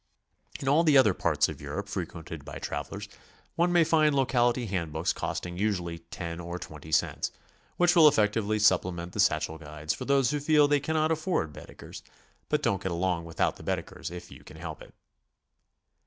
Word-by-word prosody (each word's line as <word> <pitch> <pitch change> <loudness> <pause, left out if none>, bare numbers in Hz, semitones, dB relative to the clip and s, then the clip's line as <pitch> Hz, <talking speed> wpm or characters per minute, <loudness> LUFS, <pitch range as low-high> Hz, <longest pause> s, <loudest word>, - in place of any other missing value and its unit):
In 135 - -6
all 150 +5 +4
the 150 -4 +5
other 110 -7 +6
parts 75 -4 +1
of 75 -3 -8
Europe 75 +8 -5
frequented 85 -5 -6
by - - -8
travelers 75 -1 -5 0.5
one 175 +1 +2
may 175 -1 +5
find 155 -2 +3
locality 125 -2 +2
hand 90 -6 -3
books 80 +3 0
costing 90 0 -4
usually 90 -5 -1
10 85 0 -7
or 85 0 -5
20 80 -2 -10
cents, - - +1 0.5
which 175 0 +4
will 160 -3 +8
effectively 110 -4 +2
supplement 90 -4 +1
the - - -6
satchel 80 -4 +1
guides 75 0 -4
for - - -6
those 135 -1 +3
who 150 - -1
feel 150 0 +4
they 145 0 +3
cannot 155 +2 0
afford 155 - -1
Baedekers, - - -11 0.5
but - - +1
don't 100 -1 +1
get 95 - -2
along 85 -1 -1
without 80 -1 -1
the - - -12
Baedekers - - -4
if 90 0 -9
you - - -13
can 75 - -13
help 80 -2 -7
it. - - -14
95 Hz, 185 wpm, -28 LUFS, 85-140 Hz, 0.5 s, will